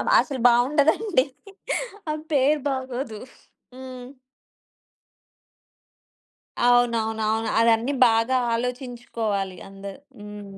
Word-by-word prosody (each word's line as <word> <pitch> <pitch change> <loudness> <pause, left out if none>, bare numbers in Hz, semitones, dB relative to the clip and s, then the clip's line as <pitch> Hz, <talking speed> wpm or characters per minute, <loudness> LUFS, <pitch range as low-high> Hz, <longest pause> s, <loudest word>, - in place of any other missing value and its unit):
అబ - - -3
అసలు 275 -4 -4
బావుండదండి. 285 - +3 0.9
ఆమె 305 0 -3
పేరు 290 +2 +3
బాగోదు. 260 -3 -4 0.6
హ్మ్. 255 -1 -9 2.6
అవునవునవును. 225 -2 +2
అవన్నీ 230 +4 +3
బాగా 230 +3 +2 0.2
ఆలోచించుకోవాలి 230 -5 -3
అందరు. 195 +4 -9 0.2
హ్మ్. 205 -1 -10
245 Hz, 75 wpm, -24 LUFS, 220-260 Hz, 2.6 s, బావుండదండి